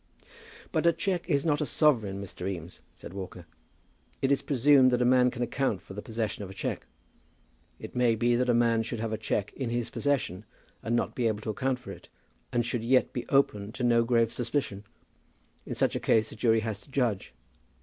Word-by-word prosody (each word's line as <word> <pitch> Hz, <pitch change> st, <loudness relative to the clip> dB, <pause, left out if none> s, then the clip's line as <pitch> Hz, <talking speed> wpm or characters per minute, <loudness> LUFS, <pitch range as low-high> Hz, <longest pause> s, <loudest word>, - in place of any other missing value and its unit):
"But -, -, +1 dB
a 170 Hz, -, +5 dB
cheque 185 Hz, -2 st, -2 dB
is 140 Hz, -2 st, +2 dB
not 150 Hz, -2 st, +2 dB
a -, -, +1 dB
sovereign, 110 Hz, -11 st, +2 dB
Mr. 95 Hz, -1 st, -5 dB
Eames," 90 Hz, -2 st, -7 dB
said -, -, -11 dB
Walker. 90 Hz, -3 st, -7 dB, 0.7 s
"It 135 Hz, -, +1 dB
is 140 Hz, -, +2 dB
presumed 135 Hz, -1 st, +5 dB
that 125 Hz, 0 st, +1 dB
a -, -, +2 dB
man 125 Hz, 0 st, +5 dB
can 125 Hz, 0 st, -3 dB
account 120 Hz, -5 st, -1 dB
for 95 Hz, +1 st, -12 dB
the 105 Hz, -, -6 dB
possession 110 Hz, -2 st, -3 dB
of 95 Hz, -, -7 dB
a 95 Hz, -, -10 dB
cheque. -, -, -4 dB, 0.9 s
It -, -, -10 dB
may 120 Hz, -2 st, +3 dB
be 120 Hz, +2 st, +2 dB
that 125 Hz, +1 st, +1 dB
a -, -, +5 dB
man 115 Hz, -1 st, +3 dB
should 115 Hz, 0 st, -4 dB
have 110 Hz, 0 st, -2 dB
a -, -, -1 dB
cheque 105 Hz, -2 st, -2 dB
in 130 Hz, -4 st, -3 dB
his 120 Hz, 0 st, -1 dB
possession 130 Hz, -10 st, -1 dB, 0.4 s
and 115 Hz, +2 st, -1 dB
not -, -, 0 dB
be 120 Hz, -2 st, 0 dB
able 110 Hz, -1 st, -1 dB
to 110 Hz, -, -3 dB
account 130 Hz, +3 st, -1 dB
for 125 Hz, -, -10 dB
it, -, -, -12 dB, 0.4 s
and 120 Hz, -2 st, +1 dB
should 120 Hz, -1 st, -2 dB
yet 130 Hz, +2 st, +3 dB
be 125 Hz, -, -4 dB
open 105 Hz, -7 st, +2 dB
to 130 Hz, -, -4 dB
no 120 Hz, -1 st, +4 dB
grave 115 Hz, -1 st, +2 dB
suspicion. 115 Hz, -4 st, -2 dB, 0.8 s
In -, -, -4 dB
such -, -, +1 dB
a -, -, 0 dB
case 110 Hz, -1 st, +2 dB
a -, -, -9 dB
jury 110 Hz, 0 st, +2 dB
has 110 Hz, -2 st, -4 dB
to -, -, -18 dB
judge. 120 Hz, -, -1 dB
120 Hz, 215 wpm, -28 LUFS, 110-130 Hz, 0.9 s, a